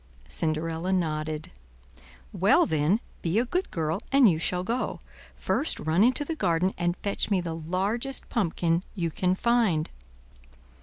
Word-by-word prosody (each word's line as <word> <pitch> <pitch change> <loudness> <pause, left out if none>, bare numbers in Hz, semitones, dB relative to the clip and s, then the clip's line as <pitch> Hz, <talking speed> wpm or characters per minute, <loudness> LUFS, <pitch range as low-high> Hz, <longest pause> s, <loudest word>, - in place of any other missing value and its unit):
Cinderella 165 +2 -2
nodded. 155 -4 -2 0.8
"Well - - +4
then, 160 +8 +1 0.2
be 170 +4 0
a 235 - +3
good 360 +9 -1
girl, 160 +2 -1
and 275 -3 +6
you 165 -5 +2
shall 180 +2 0
go. 235 +6 -2 0.4
First 300 - 0
run 160 +5 +2
into 255 +5 +2
the 325 - -2
garden 185 - +1
and 175 0 -1
fetch 200 +1 -1
me 200 -3 +2
the 170 -2 -3
largest 195 - -2
pumpkin 170 -5 0
you 170 -4 -1
can 180 +3 +1
find." 215 -8 +1
180 Hz, 145 wpm, -27 LUFS, 165-220 Hz, 0.8 s, and